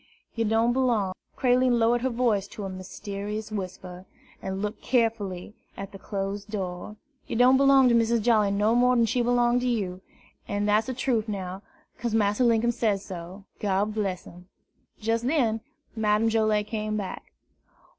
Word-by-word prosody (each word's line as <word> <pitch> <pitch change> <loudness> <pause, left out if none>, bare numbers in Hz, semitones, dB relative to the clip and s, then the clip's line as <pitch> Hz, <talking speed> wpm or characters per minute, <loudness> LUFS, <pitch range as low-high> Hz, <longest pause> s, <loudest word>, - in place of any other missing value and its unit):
Yer 230 -1 -1
don' 225 +2 +2
b'long 235 -7 +1
" - - -40
Creline 250 -1 +3
lowered 235 +1 +2
her 260 - 0
voice 230 -5 +1
to 205 - -8
a 195 - -4
mysterious 200 +3 -6
whisper, 185 -2 -6 0.3
and 190 0 -4
looked 210 +2 -4
carefully 215 -6 -1 0.2
at 195 0 -7
the 195 - -11
closed 200 +1 -4
door, 190 0 -5 0.3
"yer - - -3
don' 250 +2 +6
b'long 275 -1 +6
to 240 - +4
Missus 235 0 +3
Jolly 215 -2 +3
no 205 +3 +2
more 250 +1 +4
dan 235 -1 +4
she 245 +3 0
b'long 240 0 +2
to 250 - -1
you, 190 -6 -2 0.5
an' 205 0 -1
dat's 210 +1 +2
de 260 - -3
trufe 235 -4 0
now, 190 -2 -5 0.4
'case 235 -1 -1
Massa 210 +2 +2
Linkum 235 0 +3
say 225 -4 +1
so, 185 0 -9
God 205 +1 0
bress 195 -4 -2
him!" 180 +1 -14 0.5
Just 225 +2 -1
then 235 -7 +1 0.3
Madame 215 0 +2
Joilet 215 -2 +2
came 215 -1 -3
back. 200 -3 -6
215 Hz, 170 wpm, -26 LUFS, 200-235 Hz, 0.5 s, don